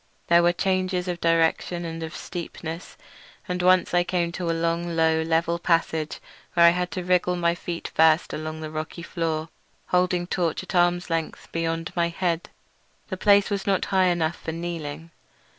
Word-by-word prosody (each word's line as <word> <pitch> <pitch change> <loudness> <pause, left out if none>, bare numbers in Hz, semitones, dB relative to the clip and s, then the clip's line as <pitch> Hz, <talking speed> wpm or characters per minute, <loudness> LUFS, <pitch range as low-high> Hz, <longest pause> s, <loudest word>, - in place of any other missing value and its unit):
There 170 0 +6
were 175 0 +4
changes 185 0 0
of 175 -1 -3
direction 165 +1 +1
and 165 0 -5
of 160 0 -6
steepness, 170 -1 -7 0.5
and 180 0 -2
once 185 0 +4
I 175 0 +4
came 175 -1 -1
to 175 -1 -3
a - - +3
long, 170 +1 -1
low, 160 0 +3
level 165 +1 +1
passage 160 -2 0 0.4
where 170 -1 +7
I 170 - +8
had 180 0 -1
to 180 - -3
wriggle 180 0 +2 0.2
feet 170 -1 -6
first 160 0 +4
along 155 0 -5
the 155 -1 -6
rocky 155 +2 -5
floor, 165 -2 -2 0.4
holding 180 -1 +2
my - - -8
torch 170 -1 0
at 185 - -8
arm's 175 -1 +2
length 165 -1 -3
beyond 165 0 -2
my 170 -1 +2
head. 170 -1 -2 0.6
The 190 - -3
place 200 +1 +4
was 200 -1 -2
not 195 -1 +2
high 190 -1 +5
enough 170 -2 0
for 160 - -5
kneeling. 165 -1 -5
170 Hz, 175 wpm, -25 LUFS, 165-180 Hz, 0.6 s, I